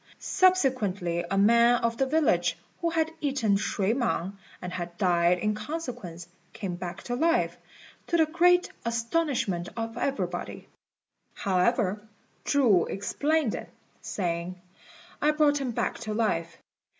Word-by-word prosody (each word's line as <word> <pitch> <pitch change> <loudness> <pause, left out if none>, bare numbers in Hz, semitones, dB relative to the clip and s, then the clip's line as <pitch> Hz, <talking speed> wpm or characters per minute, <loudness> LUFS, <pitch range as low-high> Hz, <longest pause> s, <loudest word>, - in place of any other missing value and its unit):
Subsequently 215 - +1
a 195 - 0
man 235 +4 +5
of 230 0 +1
the 270 - +1
village 310 +2 +2 0.2
who 340 - 0
had 320 -1 0
eaten 265 -8 +1
shui 200 +1 0
mang, 215 -7 -1 0.2
and 180 0 -6
had 175 -1 -5
died 175 -2 +3
in 210 +3 0
consequence, 215 - -6 0.3
came 190 -4 -4
back 175 0 -6
to 245 - -4
life, 330 +7 +1 0.5
to 340 - +2
the 320 - +5
great 355 +3 +3
astonishment 235 - -1
of 225 0 -4
everybody. 180 -10 -3 0.7
However, 200 +2 +1 0.4
Chu 235 - +3
explained 285 +6 0
it, - - -6 0.3
saying, 175 -1 -3 0.6
"I 300 - +4
brought 300 -1 +3
him 265 - -2
back 235 - -2
to 215 -3 -4
life. 170 -7 -1
225 Hz, 130 wpm, -27 LUFS, 185-285 Hz, 0.7 s, man